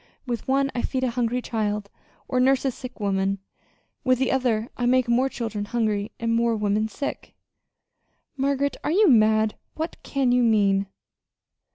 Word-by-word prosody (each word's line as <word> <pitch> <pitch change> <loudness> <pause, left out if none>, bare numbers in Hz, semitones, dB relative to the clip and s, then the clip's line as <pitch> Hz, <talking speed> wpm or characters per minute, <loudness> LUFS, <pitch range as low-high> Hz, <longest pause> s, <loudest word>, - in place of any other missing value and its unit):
With 240 -4 -4
one 275 +1 +2
I 245 - -1
feed 260 +1 -2
a 255 - +1
hungry 245 +1 -1
child, 210 -3 -2 0.4
or 255 - 0
nurse 265 +1 +3
a 265 - +2
sick 255 0 -10
woman; 195 -1 0 0.7
with 255 -2 +3
the 265 0 +1
other 240 -4 0
I 245 - -1
make 255 0 +3
more 250 +3 +2
children 220 -5 -4
hungry 215 -2 -1
and 230 0 0
more 230 0 +2
women 210 0 0
sick." 280 +6 -6 1.0
"Margaret, 280 +1 0
are - - -1
you 405 +4 +5
mad? 220 -3 +4 0.2
What 320 +2 -4
can 270 -3 0
you 250 0 +4
mean?" 200 -4 +3
240 Hz, 165 wpm, -24 LUFS, 215-260 Hz, 1.0 s, you